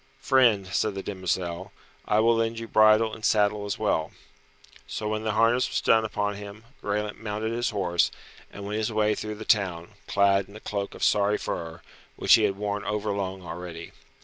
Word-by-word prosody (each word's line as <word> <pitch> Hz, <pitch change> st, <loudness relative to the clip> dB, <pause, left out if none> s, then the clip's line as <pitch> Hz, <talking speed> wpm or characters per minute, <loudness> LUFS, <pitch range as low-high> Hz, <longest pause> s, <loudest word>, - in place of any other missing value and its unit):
"Friend," 120 Hz, -7 st, +3 dB
said 100 Hz, +3 st, -1 dB
the 95 Hz, -, -5 dB
demoiselle, 95 Hz, -1 st, -3 dB, 0.4 s
"I 105 Hz, +1 st, +3 dB
will 115 Hz, +1 st, +4 dB
lend 115 Hz, 0 st, 0 dB
you 115 Hz, 0 st, -5 dB
bridle 110 Hz, 0 st, +4 dB
and 110 Hz, -, -9 dB
saddle 105 Hz, -1 st, +2 dB
as 100 Hz, -, -3 dB
well." -, -, 0 dB, 0.8 s
So 85 Hz, +11 st, -4 dB
when 110 Hz, 0 st, -2 dB
the 110 Hz, -1 st, -1 dB
harness 115 Hz, +4 st, +3 dB
was -, -, 0 dB
done 110 Hz, 0 st, +3 dB
upon 105 Hz, -1 st, -2 dB
him, 105 Hz, +1 st, -10 dB, 0.2 s
Graelent 105 Hz, 0 st, -2 dB
mounted 110 Hz, 0 st, -3 dB
his 120 Hz, +1 st, -1 dB
horse, 90 Hz, -5 st, +1 dB, 0.4 s
and 100 Hz, -, -8 dB
went 105 Hz, +2 st, -2 dB
his 110 Hz, +1 st, -1 dB
way 105 Hz, 0 st, +2 dB
through 105 Hz, 0 st, -5 dB
the 110 Hz, +1 st, -9 dB
town, 90 Hz, -4 st, +1 dB, 0.2 s
clad 100 Hz, -1 st, +2 dB
in 100 Hz, -, -14 dB
a -, -, -8 dB
cloak 100 Hz, -2 st, -4 dB
of -, -, -6 dB
sorry 105 Hz, 0 st, +3 dB
fur, 80 Hz, 0 st, -5 dB, 0.3 s
which -, -, +4 dB
he 110 Hz, -, +6 dB
had 100 Hz, -1 st, -1 dB
worn 105 Hz, 0 st, -3 dB
overlong 100 Hz, -3 st, -3 dB
already. 85 Hz, -1 st, -7 dB
105 Hz, 190 wpm, -26 LUFS, 100-110 Hz, 0.8 s, he